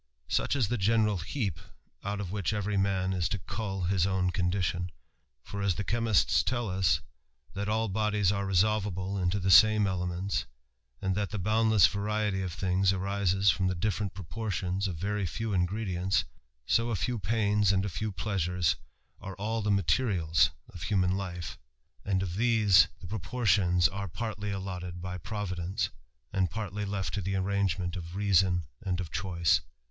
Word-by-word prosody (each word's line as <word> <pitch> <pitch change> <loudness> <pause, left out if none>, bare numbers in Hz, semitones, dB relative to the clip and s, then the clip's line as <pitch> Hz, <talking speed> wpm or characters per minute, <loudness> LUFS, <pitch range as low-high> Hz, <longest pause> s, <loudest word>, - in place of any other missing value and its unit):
Such - - +1
is 125 -7 +2
the 120 +2 -1
general 105 0 +3
heap 95 - -3 0.4
out 100 0 -3
of 95 -3 -4
which 100 0 -1
every 105 0 -1
man 95 -1 +1
is 90 -1 0
to 105 - -1
coll 95 0 -4
his 90 0 +2
own 95 -1 +1
condition: 90 -1 -1 0.5
for, 100 +1 -6
as 100 -3 +1
the 100 - -2
chemists 115 -2 +2
tell 120 -5 -1
us, 90 -4 +2 0.5
that 100 +1 -3
all 110 +1 +1
bodies 105 -1 +1
are 100 -1 -1
resolvable 95 0 +1
into 90 +2 0
the 95 0 +1
same 110 +4 +7
elements, 90 0 -2 0.6
and 95 -1 +1
that 100 0 -1
the 105 - -4
^—J^OUndless 110 0 +4
variety 105 -1 -1
of 95 -2 -3
things 95 +2 +1
arises 95 0 +2
from 95 -1 0
the 95 - 0
diSerent 100 +1 -1
propoi 95 +5 -6
^Hllpiis 95 0 -1
of 90 - -3
very 100 +3 -1
few 110 +6 -3
ingredients; 95 0 0 0.4
so 115 +1 +2
a 115 - 0
few 115 +6 -1
pains 105 0 +2
and 95 0 +1
a - - -1
few 105 +4 -3
^^BButucft 90 -2 0 0.4
are 100 -1 -7
all 110 +3 -2
the 105 - -1
materials 85 -4 +2 0.2
of 85 - -11
hunian 90 0 +1
life, 90 -3 -5 0.4
and 95 -2 0
of 90 -1 -4
these 110 -4 +5
THE - - -12
RAMBLER. - - -29
the 90 - -8
proportions 100 -3 +2
are 100 +1 -5
partly 105 +2 -4
allotted 90 -2 -5
by 90 +1 -5
Providence, 90 -1 -3 0.4
and 95 -2 +1
ijartly 105 +1 -4
left 95 -5 -2
to 100 - -1
the 95 +2 -2
arrangement 95 -2 0
of 85 -1 -7
reason 95 -3 +3 0.2
and 95 -1 -2
of 90 -4 -5
choice. 90 -1 +1
95 Hz, 175 wpm, -29 LUFS, 90-105 Hz, 0.6 s, same